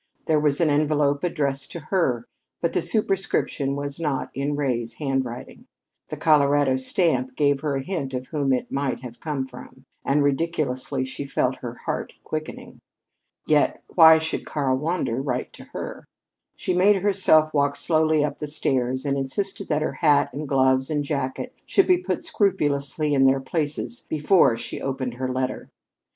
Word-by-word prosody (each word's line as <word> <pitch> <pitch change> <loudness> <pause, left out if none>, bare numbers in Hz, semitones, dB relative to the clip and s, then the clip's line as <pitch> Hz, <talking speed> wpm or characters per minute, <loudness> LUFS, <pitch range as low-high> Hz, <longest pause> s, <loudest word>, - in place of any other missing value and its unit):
There 155 -1 +3
was 145 -1 +1
an 165 -3 +3
envelope 145 -1 +1
addressed 140 -5 -1
to 170 - -5
her, 130 -11 +1 0.3
but 170 - -1
the - - +1
superscription 195 -9 0
was 140 +1 -5
not 140 -5 -2
in 140 +2 -2
Ray's 120 -5 -1
handwriting. 130 -1 -4 0.4
The - - -5
Colorado 145 -3 +3
stamp 130 -2 0
gave 145 -2 +2
her 145 -1 -2
a 135 - -2
hint 140 -7 -3
of 125 0 -4
whom 145 -4 0
it 125 -1 -1
might 135 -3 -2
have 120 -2 -9
come 145 -4 -3
from, 130 +1 -13 0.2
and 140 +1 +2
ridiculously 140 -3 -1
she 130 +2 -6
felt 130 -1 0
her 120 -1 -7
heart - - -3
quickening. 155 0 -6 0.7
Yet 150 -1 +2
why 160 -2 +8
should 160 0 -2
Karl 135 -3 0
Wander 150 -5 -1
write 125 -3 -3
to - - -12
her? - - -7 0.5
She - - -2
made 190 +2 +4
herself 170 -6 +4
walk 140 -1 +2
slowly 155 +1 +2
up - - -5
the 150 - -4
stairs, 130 -2 -1
and 140 -1 0
insisted 190 +9 -3
that 150 -1 0
her - - -2
hat 150 -4 +2
and 145 +1 -5
gloves 130 0 +3
and 150 -2 0
jacket 140 - -3
should 390 - +4
be 365 -1 +4
put 360 -1 -3
scrupulously 150 - 0
in 135 -1 +4
their 135 0 +4
places 150 - -3
before 150 -5 +3
she - - -6
opened 130 -2 -3
her 130 0 -2
letter. 130 0 -3
145 Hz, 165 wpm, -24 LUFS, 130-155 Hz, 0.7 s, why